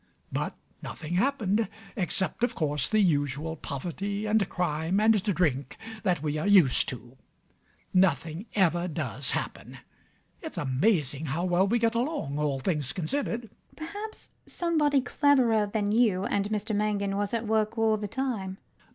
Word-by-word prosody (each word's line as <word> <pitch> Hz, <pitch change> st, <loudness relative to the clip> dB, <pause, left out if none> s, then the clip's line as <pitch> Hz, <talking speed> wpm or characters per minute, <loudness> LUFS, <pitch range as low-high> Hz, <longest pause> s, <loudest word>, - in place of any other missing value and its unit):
But -, -, -2 dB, 0.3 s
nothing 160 Hz, +1 st, -6 dB
happened, 220 Hz, -1 st, +1 dB, 0.3 s
except, 190 Hz, -1 st, -1 dB
of 245 Hz, -, +1 dB
course, 150 Hz, -3 st, 0 dB
the 215 Hz, -, +3 dB
usual 150 Hz, -2 st, 0 dB
poverty 190 Hz, +9 st, -4 dB
and 215 Hz, -2 st, +2 dB
crime 170 Hz, +1 st, 0 dB
and 215 Hz, -1 st, +4 dB
drink 160 Hz, -, 0 dB, 0.2 s
that 180 Hz, -7 st, 0 dB
we 150 Hz, 0 st, -1 dB
are 175 Hz, -, -1 dB
used 185 Hz, -10 st, +5 dB
to. 125 Hz, +1 st, -9 dB, 0.8 s
Nothing 175 Hz, +1 st, +1 dB
ever 175 Hz, -3 st, +2 dB
does 165 Hz, -, -3 dB
happen. -, -, -3 dB, 0.6 s
It's 320 Hz, -, -7 dB
amazing 150 Hz, -, +1 dB
how 165 Hz, +6 st, -1 dB
well 180 Hz, +2 st, +3 dB
we 235 Hz, +4 st, +2 dB
get 230 Hz, -1 st, +2 dB
along, 235 Hz, -, -2 dB
all 145 Hz, -3 st, 0 dB
things 150 Hz, -3 st, -1 dB
considered. 235 Hz, -, -2 dB
LADY 230 Hz, -, -14 dB, 0.2 s
UTTERWORD. -, -, -25 dB
Perhaps 430 Hz, +3 st, -7 dB, 0.2 s
somebody 300 Hz, -5 st, +2 dB
cleverer 250 Hz, -6 st, +3 dB
than 205 Hz, 0 st, -1 dB
you 215 Hz, -5 st, +3 dB
and 200 Hz, 0 st, 0 dB
Mr 215 Hz, 0 st, -2 dB
Mangan 205 Hz, -1 st, 0 dB
was 205 Hz, 0 st, -1 dB
at 230 Hz, -1 st, -1 dB
work 220 Hz, +1 st, +1 dB
all 225 Hz, -1 st, +3 dB
the 210 Hz, 0 st, -4 dB
time. 205 Hz, -6 st, -3 dB
195 Hz, 150 wpm, -28 LUFS, 160-220 Hz, 0.8 s, used